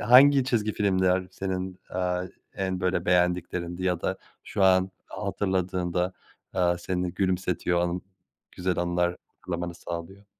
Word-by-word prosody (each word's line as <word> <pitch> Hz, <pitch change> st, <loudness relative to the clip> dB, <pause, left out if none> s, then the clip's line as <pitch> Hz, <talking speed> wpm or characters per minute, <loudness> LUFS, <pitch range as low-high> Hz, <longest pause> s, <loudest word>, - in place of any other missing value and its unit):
hangi 130 Hz, +4 st, +7 dB
çizgi 110 Hz, -5 st, +1 dB
filmler 95 Hz, -2 st, +2 dB
senin, 95 Hz, -1 st, -3 dB, 0.2 s
eee, 90 Hz, 0 st, 0 dB, 0.3 s
en 95 Hz, -1 st, -2 dB
böyle 90 Hz, -1 st, +1 dB
beğendiklerindi 90 Hz, 0 st, +1 dB
ya 90 Hz, -2 st, +1 dB
da 95 Hz, +2 st, -1 dB, 0.3 s
şu 100 Hz, -, -1 dB
an 95 Hz, 0 st, +5 dB, 0.2 s
hatırladığında, 95 Hz, -2 st, -1 dB, 0.4 s
eee, 95 Hz, -, 0 dB, 0.2 s
seni 90 Hz, 0 st, -2 dB
gülümsetiyor 90 Hz, -2 st, +1 dB
o -, -, +2 dB
an 90 Hz, +1 st, -1 dB, 0.5 s
güzel 90 Hz, 0 st, -1 dB
anılar 85 Hz, 0 st, +1 dB, 0.2 s
hatırlamanı 85 Hz, -1 st, -4 dB
sağlıyor? 90 Hz, +4 st, -7 dB
90 Hz, 125 wpm, -27 LUFS, 90-95 Hz, 0.5 s, hangi